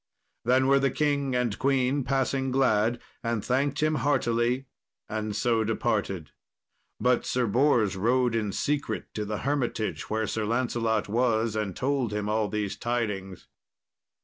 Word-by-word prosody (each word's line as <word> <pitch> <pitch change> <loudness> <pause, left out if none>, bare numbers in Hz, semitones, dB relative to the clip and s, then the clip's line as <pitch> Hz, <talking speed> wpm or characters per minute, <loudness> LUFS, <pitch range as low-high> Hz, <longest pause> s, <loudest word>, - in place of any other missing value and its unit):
Then 130 +2 +4
were 140 +1 +5
the 135 0 +2
king 140 -1 0
and 120 -4 0
queen 135 0 +2
passing 135 0 0
glad, 120 -3 +2 0.2
and 115 -3 -1
thanked 140 +3 0
him 155 0 +2
heartily, 120 -1 +1 0.4
and 110 -1 -3
so 115 0 +2
departed. 105 -6 -1 0.7
But 125 0 +2
Sir 125 -1 0
Bors 120 -3 +3
rode 120 +5 +2
in 110 -3 0
secret 140 -2 -2
to 105 - -3
the 105 0 -3
hermitage 130 -6 -1
where 110 +1 0
Sir 110 +1 -2
Lancelot 115 -2 0
was, 115 0 +1
and 105 -4 -2
told 130 -4 0
him 105 0 -2
all 110 0 +1
these 105 0 -2
tidings. 105 -6 -3
120 Hz, 145 wpm, -27 LUFS, 110-130 Hz, 0.7 s, were